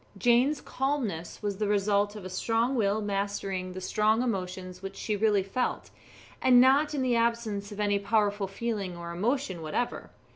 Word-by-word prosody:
Jane's 245 Hz, +7 st, +3 dB
calmness 245 Hz, -, -3 dB
was 200 Hz, -2 st, -2 dB
the 210 Hz, -, -1 dB
result 205 Hz, 0 st, +1 dB
of 205 Hz, -3 st, -8 dB
a -, -, -5 dB
strong 230 Hz, +6 st, 0 dB
will 215 Hz, -3 st, +1 dB
mastering 195 Hz, -2 st, -2 dB
the 185 Hz, -, -6 dB
strong 215 Hz, +4 st, +2 dB
emotions 185 Hz, -4 st, -4 dB
which 195 Hz, 0 st, -7 dB
she 215 Hz, -, -2 dB
really 205 Hz, -1 st, +2 dB
felt, 220 Hz, +6 st, -2 dB, 0.5 s
and 250 Hz, -1 st, +6 dB
not 280 Hz, +4 st, +4 dB
in 270 Hz, -, 0 dB
the 250 Hz, -2 st, +2 dB
absence 230 Hz, -3 st, 0 dB
of 205 Hz, -, -8 dB
any 205 Hz, -1 st, +2 dB
powerful 205 Hz, -1 st, +1 dB
feeling 195 Hz, -3 st, -3 dB
or 170 Hz, 0 st, -6 dB
emotion 200 Hz, 0 st, -1 dB
whatever. 160 Hz, +10 st, -3 dB
205 Hz, 170 wpm, -28 LUFS, 195-235 Hz, 0.5 s, and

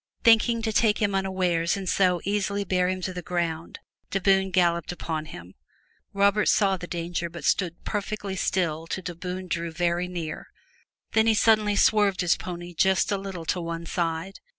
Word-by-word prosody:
Thinking 230 Hz, 0 st, +4 dB
to 220 Hz, -1 st, -1 dB
take 215 Hz, -1 st, +3 dB
him 205 Hz, -2 st, +1 dB
unawares 185 Hz, -2 st, 0 dB
and 195 Hz, -1 st, -6 dB
so 180 Hz, -2 st, +2 dB
easily 200 Hz, 0 st, -1 dB
bear 180 Hz, -1 st, +1 dB
him 185 Hz, 0 st, -2 dB
to 185 Hz, +1 st, -3 dB
the 180 Hz, -, -5 dB
ground, 170 Hz, -2 st, -3 dB, 0.3 s
de 195 Hz, -, -1 dB
Bohun 190 Hz, 0 st, +3 dB
galloped 170 Hz, -3 st, +1 dB
upon 160 Hz, -3 st, -4 dB
him. 90 Hz, -, -11 dB, 0.6 s
Robert 200 Hz, +1 st, +2 dB
saw 195 Hz, -2 st, +3 dB
the 180 Hz, -1 st, -7 dB
danger 170 Hz, 0 st, -3 dB
but 170 Hz, +1 st, -9 dB
stood 175 Hz, -3 st, 0 dB
perfectly 205 Hz, -1 st, -3 dB
still 165 Hz, -4 st, -1 dB
till 190 Hz, -, -4 dB
de 175 Hz, -, -4 dB
Bohun 180 Hz, +2 st, -6 dB
drew 170 Hz, -1 st, -2 dB
very 175 Hz, +1 st, 0 dB
near, 170 Hz, -4 st, -5 dB, 0.6 s
then 220 Hz, 0 st, +3 dB
he 225 Hz, -, +4 dB
suddenly 215 Hz, -1 st, +3 dB
swerved 205 Hz, -2 st, +3 dB
his 175 Hz, -2 st, +3 dB
pony 175 Hz, -1 st, -7 dB
just 190 Hz, +4 st, +2 dB
a 200 Hz, -, +1 dB
little 190 Hz, -4 st, -6 dB
to 175 Hz, +2 st, -1 dB
one 170 Hz, 0 st, -5 dB
side. 165 Hz, +2 st, -3 dB
185 Hz, 180 wpm, -26 LUFS, 170-200 Hz, 0.6 s, Thinking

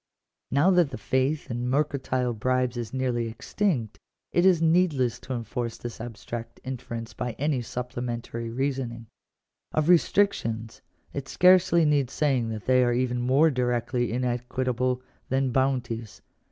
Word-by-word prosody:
Now 145 Hz, +8 st, +4 dB
that 175 Hz, -5 st, +4 dB
the 130 Hz, -, -6 dB
faith 135 Hz, +2 st, 0 dB
in 120 Hz, +1 st, -2 dB
mercantile 130 Hz, -3 st, 0 dB
bribes 125 Hz, +2 st, 0 dB
is 120 Hz, -3 st, -4 dB
nearly 125 Hz, -3 st, -1 dB
extinct, 120 Hz, -, -2 dB, 0.3 s
it 175 Hz, +2 st, +4 dB
is 180 Hz, -3 st, +5 dB
need 165 Hz, +1 st, +3 dB
less 125 Hz, -4 st, 0 dB
to 130 Hz, -, -6 dB
enforce 115 Hz, 0 st, -4 dB
this 120 Hz, -2 st, -7 dB
abstract 115 Hz, 0 st, -7 dB
inference 120 Hz, -3 st, -6 dB
by 125 Hz, -2 st, -3 dB
any 140 Hz, 0 st, 0 dB
supplementary 120 Hz, -1 st, -4 dB
reasoning. 125 Hz, -2 st, -2 dB, 0.7 s
Of 155 Hz, +1 st, +1 dB
restrictions 135 Hz, -, +2 dB, 0.3 s
it 140 Hz, -2 st, -5 dB
scarcely 180 Hz, -1 st, +5 dB
needs 145 Hz, -4 st, +2 dB
saying 130 Hz, -6 st, +1 dB
that 110 Hz, -2 st, -5 dB
they 130 Hz, 0 st, +4 dB
are 120 Hz, -1 st, +2 dB
even 125 Hz, 0 st, 0 dB
more 135 Hz, +6 st, +4 dB
directly 125 Hz, -1 st, 0 dB
inequitable 125 Hz, +1 st, -1 dB, 0.3 s
than 130 Hz, 0 st, +1 dB
bounties. 120 Hz, -4 st, -1 dB
125 Hz, 140 wpm, -26 LUFS, 120-140 Hz, 0.7 s, is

